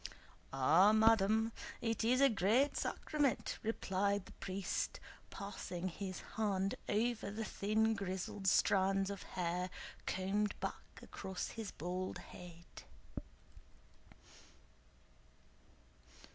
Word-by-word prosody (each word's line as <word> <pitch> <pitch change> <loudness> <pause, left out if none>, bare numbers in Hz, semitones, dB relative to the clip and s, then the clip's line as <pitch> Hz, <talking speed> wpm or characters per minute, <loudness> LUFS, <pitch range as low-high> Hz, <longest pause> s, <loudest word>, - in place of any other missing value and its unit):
"Ah, 160 +10 +5
madam, 220 0 +4 0.3
it 225 -1 -1
is 250 +4 +3
a 275 - +8
great 225 +7 +3
sacrament," 290 -5 0
replied 200 -2 0
the - - -13
priest, 190 0 -3 0.3
passing 190 -3 -5
his 185 +1 -5 0.2
hand 195 -3 +1 0.2
over 220 0 +1
the 215 +2 -4
thin 220 +3 +1
grizzled 195 0 -3
strands 195 +1 +3
of 200 - -6
hair 180 +1 -2 0.4
combed 200 +3 0
back - - -6
across 190 -1 -5
his 225 -3 -5
bald 180 +3 -4
head. 175 -1 -11
200 Hz, 95 wpm, -37 LUFS, 185-220 Hz, 0.4 s, a